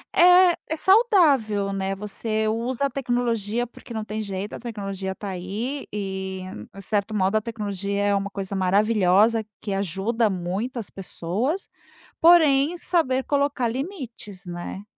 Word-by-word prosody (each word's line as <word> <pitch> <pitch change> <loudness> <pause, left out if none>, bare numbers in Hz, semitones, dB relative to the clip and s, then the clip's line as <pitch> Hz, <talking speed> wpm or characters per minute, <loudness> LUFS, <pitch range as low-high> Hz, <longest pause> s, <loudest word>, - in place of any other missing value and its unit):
É, 360 0 +7
é 320 - 0
saudável, 300 - +3
né. 195 0 -2
Você 215 +2 -2
usa 235 +5 -1
a - - +1
tecnologia 240 -4 -1
porque 240 0 -12
não 220 -1 -3
tem 215 0 -4
jeito, 200 0 -5
a - - -6
tecnologia 195 -5 -5
tá 205 - -6
aí 205 +10 -4
e 190 -2 -4
em 190 +1 -9
certo 205 +2 -1
modo, 195 +1 +1
a 215 - +3
tecnologia 200 -3 -3
é 205 0 +2
uma 200 0 -1
coisa 195 0 -5
maravilhosa 205 +3 +3 0.2
que 200 -2 -4
ajuda 200 +4 0
muitas 195 +6 -3
pessoas, 200 - -3 0.5
porém, 320 -2 +5
saber 265 -8 +1
colocar 280 -3 +1
limites, 240 - -6
né? 175 +2 -6
215 Hz, 140 wpm, -24 LUFS, 195-255 Hz, 0.5 s, É